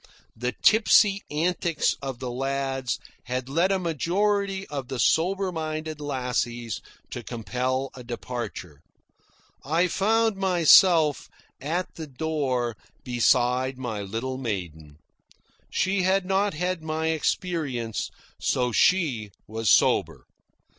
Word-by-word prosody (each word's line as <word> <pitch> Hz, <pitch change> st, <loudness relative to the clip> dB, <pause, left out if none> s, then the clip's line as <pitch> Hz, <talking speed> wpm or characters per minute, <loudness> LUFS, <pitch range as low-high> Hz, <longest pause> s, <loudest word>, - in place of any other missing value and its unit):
The 125 Hz, +2 st, -2 dB
tipsy 210 Hz, -2 st, +5 dB
antics 170 Hz, +1 st, 0 dB
of 135 Hz, -3 st, -4 dB
the 125 Hz, 0 st, -5 dB
lads 135 Hz, 0 st, -2 dB, 0.3 s
had 125 Hz, 0 st, -3 dB
led 170 Hz, +8 st, +2 dB
a 195 Hz, -, +3 dB
majority 195 Hz, +4 st, 0 dB
of 140 Hz, -6 st, -5 dB
the 130 Hz, -, -4 dB
soberer 185 Hz, -, +2 dB
minded 155 Hz, -2 st, -4 dB
lassies 125 Hz, -4 st, -2 dB, 0.3 s
to -, -, -5 dB
compel 125 Hz, +3 st, -2 dB
a 125 Hz, -, -10 dB
departure. 120 Hz, -, -6 dB, 0.8 s
I 165 Hz, +5 st, +2 dB
found 220 Hz, +3 st, +1 dB
myself, 175 Hz, -4 st, +5 dB, 0.3 s
at 170 Hz, +6 st, -2 dB
the 160 Hz, -2 st, -6 dB
door, 130 Hz, -5 st, -1 dB, 0.3 s
beside 125 Hz, +1 st, +2 dB
my 120 Hz, -5 st, -4 dB
little 115 Hz, +6 st, -4 dB
maiden. 85 Hz, -, -5 dB, 0.7 s
She 190 Hz, +1 st, +1 dB
had 190 Hz, +1 st, +2 dB
not 195 Hz, -1 st, +1 dB
had 180 Hz, +1 st, -2 dB
my 160 Hz, 0 st, -2 dB
experience, 155 Hz, -, -2 dB, 0.3 s
so 125 Hz, -1 st, 0 dB
she 130 Hz, -, +2 dB, 0.2 s
was 110 Hz, 0 st, -2 dB
sober. -, -, +3 dB
140 Hz, 115 wpm, -26 LUFS, 125-180 Hz, 0.8 s, tipsy